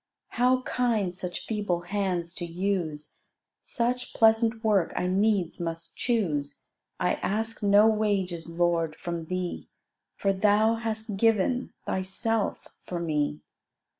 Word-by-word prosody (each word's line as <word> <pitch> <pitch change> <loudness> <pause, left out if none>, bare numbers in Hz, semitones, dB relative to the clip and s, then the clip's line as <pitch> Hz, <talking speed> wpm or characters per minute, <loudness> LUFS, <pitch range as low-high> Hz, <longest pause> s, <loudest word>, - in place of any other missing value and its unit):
How 255 +1 +2
kind 225 -9 0
such 180 -1 -5
feeble 205 -6 -1
hands 180 -2 -2
to 175 - -3
use; 170 -4 -3 0.4
Such 245 +1 -2
pleasant 225 +1 +4
work 205 -6 +2
I - - 0
needs 190 -1 +1
must 165 -1 -5
choose: 155 - -1 0.3
I 180 -1 +2
ask 225 +3 -2
no 205 +1 +6
wages, 200 -6 +1
Lord, 165 -2 +1
from 170 -2 -5
thee, 185 +1 -4 0.5
For 195 -1 +1
Thou 210 +3 +4
hast 220 -2 -3
given 225 +4 +2
Thyself 195 +3 -1 0.2
for 175 - -4
me. 150 -3 -1
195 Hz, 120 wpm, -27 LUFS, 175-220 Hz, 0.5 s, no